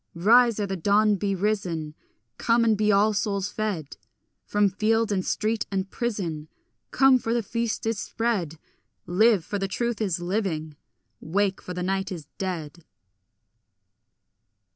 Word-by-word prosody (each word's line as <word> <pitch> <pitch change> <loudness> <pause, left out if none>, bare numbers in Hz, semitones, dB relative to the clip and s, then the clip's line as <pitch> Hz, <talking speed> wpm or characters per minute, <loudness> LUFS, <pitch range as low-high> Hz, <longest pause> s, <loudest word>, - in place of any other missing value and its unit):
Rise, 230 +5 +5
ere 205 - 0
the 195 -1 -3
dawn 205 +4 +3
be 195 +1 -1
risen; 180 -6 -2 0.5
Come, 230 0 +3
and 220 -1 +4
be 210 0 +2
all 205 +2 +4
souls 200 -1 -1
fed; 200 -9 -4 0.5
From 205 0 +3
field 220 +3 +1
and 190 -2 0
street 215 +3 -1
and 190 0 -2
prison 180 -10 -3 0.4
Come, 270 -1 +5
for 230 0 -1
the 235 - 0
feast 230 +1 -2
is 225 -2 -1
spread; 205 -11 -2 0.5
Live, 205 0 +3
for 205 - -3
the 195 - -1
truth 235 +2 -2
is 185 -5 0
living; 175 -5 -2 0.4
wake, 195 +3 -1
for 180 - -7
night 190 +2 -2
is 165 -5 -6
dead. 170 -4 -4
200 Hz, 140 wpm, -25 LUFS, 180-220 Hz, 0.5 s, Rise